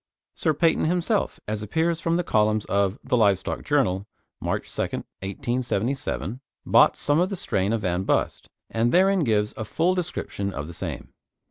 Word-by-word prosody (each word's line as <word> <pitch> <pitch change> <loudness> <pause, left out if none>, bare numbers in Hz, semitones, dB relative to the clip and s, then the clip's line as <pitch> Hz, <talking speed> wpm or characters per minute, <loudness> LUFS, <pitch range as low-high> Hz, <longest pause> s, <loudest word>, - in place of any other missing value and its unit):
Sir 155 - 0
Paynton 165 +2 +2
himself, 180 +5 0
as 105 0 -2
appears 160 +10 0
from 165 0 +1
the 175 - 0
columns 110 -3 +2
of 100 +1 +1
The 130 - +1
Live 100 -5 +4
Stock 95 - -5
Journal 105 -10 +1 0.3
(March - - -2
2nd, - - -3 0.2
1877), 120 +3 -2 0.2
bought - - +5
some 145 +2 +2
of 180 +2 +2
the 200 - -3
strain 100 - -1
of 115 -1 0
Van 90 -2 0
Bust, 95 - -1 0.2
and 115 +2 +1
therein 190 0 +4
gives 105 -4 +1
a - - -4
full 165 - +1
description 100 - -3
of 75 - -4
the 85 - -9
same. - - -6
120 Hz, 170 wpm, -25 LUFS, 100-165 Hz, 0.3 s, bought